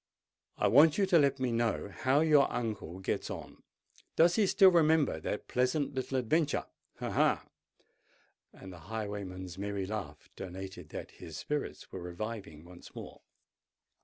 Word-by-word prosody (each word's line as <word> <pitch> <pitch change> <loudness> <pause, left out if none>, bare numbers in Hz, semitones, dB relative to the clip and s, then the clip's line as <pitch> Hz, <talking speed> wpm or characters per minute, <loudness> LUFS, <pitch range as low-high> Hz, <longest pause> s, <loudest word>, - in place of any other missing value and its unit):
"I - - +2
want 150 +4 +6
you 200 - +3
to 180 -3 +5
let 140 -2 +2
me 130 -2 0
know 115 -3 0
how 130 - +2
your 150 -3 +4
uncle 105 -7 -4
gets - - -2
on. - - -8 0.5
Does 170 +1 +5
he 210 -3 +3
still 190 0 +6
remember 160 - +3
that - - -4
pleasant 130 +4 0
little 130 0 -2
adventure—ha! 145 +5 -2
ha!"—and 95 -1 -5
the 90 - -11
highwayman's 100 -4 -5
merry 100 -1 -2
laugh 95 -8 -6
denoted 95 -3 -8
that - - -7
his 80 -2 -10
spirits 150 -1 -4
were 95 - -6
reviving 90 -3 -6
once 90 0 -14
more. - - -9
115 Hz, 140 wpm, -31 LUFS, 95-145 Hz, 0.5 s, want